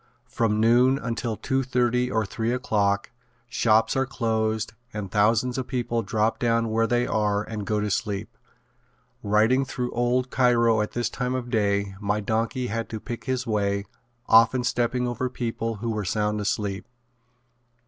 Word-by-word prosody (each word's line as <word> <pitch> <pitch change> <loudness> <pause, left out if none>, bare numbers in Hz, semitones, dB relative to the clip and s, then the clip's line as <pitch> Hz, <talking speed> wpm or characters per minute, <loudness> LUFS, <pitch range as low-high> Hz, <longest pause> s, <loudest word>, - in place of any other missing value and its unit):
From 110 -2 0
noon 120 +4 +4
until 115 -4 -3
two 135 0 0
thirty 125 -1 +1
or 110 -3 0
three 115 +4 -2
o'clock 105 -6 0 0.4
shops 110 -2 +2
are 135 0 +1
closed 110 -4 -1 0.2
and 105 -3 -5
thousands 115 +5 +2
of 130 - -4
people 120 -2 -1
drop 110 +2 0
down 115 -1 +1
where 115 +1 +2
they 120 +2 +1
are 105 -1 0
and 110 -2 -6
go 105 -1 +1
to 105 0 -1
sleep. 105 +4 -3 0.9
Riding 110 +6 +3
through 125 -1 -4
old 125 +2 0
Cairo 115 -3 +3
at 105 - -3
this 120 0 0
time 125 0 -2
of 125 -1 -4
day 100 -3 +1
my 105 +1 0
donkey 115 +4 -1
had 115 0 -3
to 110 - -5
pick 120 +2 -7
his 130 -1 -1
way, 100 -2 0 0.4
often 115 +3 +5
stepping 125 0 0
over 120 +1 -2
people 115 -2 -3
who 115 +2 -3
were 105 -1 -2
sound 105 +2 -1
asleep. 100 -1 -2
115 Hz, 160 wpm, -25 LUFS, 105-125 Hz, 0.9 s, often